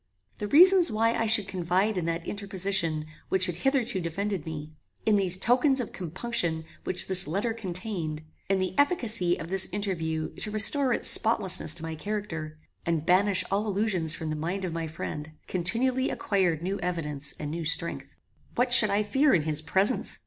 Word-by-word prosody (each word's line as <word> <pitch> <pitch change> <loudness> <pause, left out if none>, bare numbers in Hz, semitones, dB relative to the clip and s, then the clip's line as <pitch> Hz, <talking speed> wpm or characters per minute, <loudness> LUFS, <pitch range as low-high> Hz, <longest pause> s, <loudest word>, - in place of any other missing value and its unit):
The 210 - -4
reasons 360 - +5
why 225 +2 0
I 225 - -2
should 215 -2 +4
confide 185 +4 -2
in 180 -3 -3
that 165 0 -4
interposition 190 -6 -1 0.2
which 190 -1 +3
had 175 -3 -3
hitherto 250 -4 -1
defended 180 0 -5
me; 155 -1 -8 0.3
in 215 - +2
those 185 -3 +2
tokens 260 +6 +1
of 245 - -5
compunction 170 -2 -3 0.2
which 180 - -1
this 185 -3 +3
letter 200 +8 -3
contained; 180 -6 -5 0.3
in 195 - +1
the 185 -1 -3
efficacy 230 - 0
of 165 - -8
this 190 0 +4
interview 165 -6 -4
to - - -4
restore 250 +6 +7
its - - -2
spotlessness 190 -8 +4
to 165 - -4
my 160 0 -6
character, 160 -4 -6 0.3
and 165 -2 -3
banish 190 +2 +2
all 205 +2 -1
illusions 195 -6 +1
from 160 -2 -6
the - - -3
mind 175 +5 -4
of 175 - -6
my 165 -1 -5
friend, 155 -1 -8
continually 245 +9 -1
acquired 180 -6 -2
new 195 +3 -4
evidence 150 -5 -2
and 150 -1 -6
new 165 +1 -5
strength. 165 +1 -2 0.4
What 245 0 0
should 215 -4 +8
I 200 +1 0
fear 265 +6 +1
in 160 - 0
his 155 -1 -2
presence? 190 +9 -1
190 Hz, 180 wpm, -26 LUFS, 165-215 Hz, 0.4 s, should